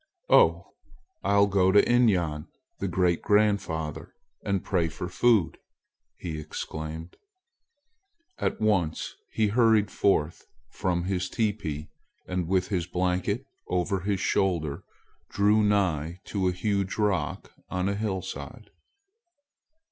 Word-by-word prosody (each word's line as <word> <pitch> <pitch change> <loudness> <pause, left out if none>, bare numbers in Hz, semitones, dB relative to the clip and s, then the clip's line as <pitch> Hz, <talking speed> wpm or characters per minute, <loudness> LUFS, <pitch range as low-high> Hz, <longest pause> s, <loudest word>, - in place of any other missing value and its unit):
"Oh! - - +4 0.5
I'll 100 0 +4
go 95 -2 +3
to 105 - +6
Inyan, 90 -11 +2 0.3
the - - -1
great 90 -2 +1
grandfather, 100 -7 0 0.3
and 100 -2 -1
pray 90 -4 +1
for 80 +3 -6
food!" 105 0 +2 0.6
he 80 -3 -5
exclaimed. 80 +2 -6 1.2
At - - -1
once 95 -7 0 0.2
he 110 -2 +1
hurried 110 -2 +3
forth 85 -5 0 0.2
from 85 -2 -1
his 90 -1 -2
teepee 100 -10 -2 0.4
and, 90 -2 -2
with 95 0 +1
his 90 -4 -1
blanket 90 +7 -1 0.2
over 90 +2 0
one 100 +2 -1
shoulder, 85 -6 0 0.5
drew 105 +2 +3
nigh 90 -5 +1
to 95 -3 -1
a - - +2
huge 100 +1 -1
rock 105 -4 -1 0.2
on 90 0 -1
a 100 - 0
hillside. 100 -3 -5
95 Hz, 115 wpm, -27 LUFS, 85-105 Hz, 1.2 s, to